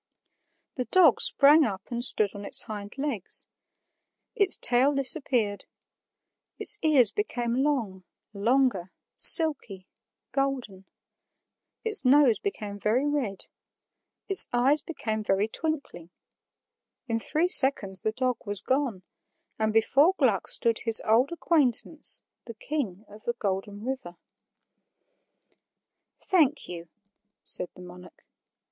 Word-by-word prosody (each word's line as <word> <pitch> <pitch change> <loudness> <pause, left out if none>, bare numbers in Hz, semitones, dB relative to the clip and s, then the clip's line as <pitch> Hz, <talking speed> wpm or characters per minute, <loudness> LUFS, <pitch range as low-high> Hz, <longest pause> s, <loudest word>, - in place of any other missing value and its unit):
The 250 - -3
dog 370 +6 +3
sprang 295 +3 +6
up 195 -8 -4
and 240 0 -4
stood 215 -5 +1
on 205 -1 -10
its - - +4
hind 205 +1 -9
legs. 270 -9 -1 0.9
Its 400 -2 0
tail 260 +4 +3
disappeared; 255 -7 0 0.9
its 420 - +2
ears 275 -9 +2
became 245 - -3
long, 230 -11 -3 0.3
longer, 220 -3 -1 0.2
silky, 270 - +5 0.5
golden; 255 -9 -4 1.0
its 435 -2 +3
nose 265 -3 +3
became 210 - -7
very 235 +7 -1
red; 260 -10 -4 0.8
its 390 -1 +6
eyes 265 +5 +1
became 220 -9 -6
very 200 +1 -1
twinkling; 280 - -5 1.0
in 230 -1 -2
three 315 +9 -1
seconds 260 - +2
the 220 - -2
dog 255 +1 -3
was 205 -2 -1
gone, 260 -8 -3 0.6
and 220 0 -1
before 275 - +2
Gluck 225 -9 0
stood 230 -1 -2
his 225 -2 +2
old 235 +7 +1
acquaintance, 310 -3 +1 0.2
the 230 - -11
King 220 -7 -6
of 210 +1 -16
the 235 - -2
Golden 205 -1 -5
River. 250 -10 -7 2.0
"Thank 325 -8 0
you," 170 -1 -10 0.5
said 180 - 0
the 180 - -13
monarch. 180 0 -16
240 Hz, 115 wpm, -25 LUFS, 205-285 Hz, 2.0 s, sprang